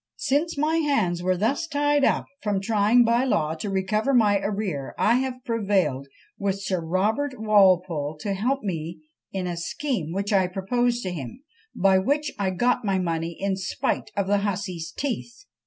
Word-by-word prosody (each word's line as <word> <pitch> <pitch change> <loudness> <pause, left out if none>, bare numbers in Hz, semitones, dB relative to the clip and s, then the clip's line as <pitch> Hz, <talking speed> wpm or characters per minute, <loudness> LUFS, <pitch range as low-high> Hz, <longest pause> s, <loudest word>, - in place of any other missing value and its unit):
Since 295 +4 0
my 310 +3 +1
hands 220 - +1
were 185 0 +1
thus 255 - 0
tied 290 -1 +1
up - - +2 0.2
from 205 -2 0
trying 215 +3 +4
by 235 +2 +3
law 160 -12 +1
to 165 +6 -5
recover 210 +7 0
my 205 -4 +4
arrear, 195 -9 -3
I 235 +3 +3
have 255 0 -3
prevailed 195 - 0 0.3
with 195 -1 -1
Sir 185 -3 -2
Robert 215 - 0
Walpole 185 -8 +3
_to 200 - -1
help 250 +7 -1
me 165 -4 -4 0.3
in 190 -1 -3
a 175 -1 -2
scheme 175 - -3
which 200 +3 -2
I 190 -2 +4
proposed 240 +6 0
to 185 - -3
him, 150 - -7 0.3
by 190 0 +4
which 285 +7 0
I 195 -2 +1
got 240 +7 +1
my 195 -2 +1
money 165 -2 -2
in 195 0 0
spite 190 0 -2
of 200 - +1
the 200 +1 +2
hussy's 185 -4 -3
teeth. 235 -4 -5
200 Hz, 170 wpm, -25 LUFS, 185-240 Hz, 0.3 s, trying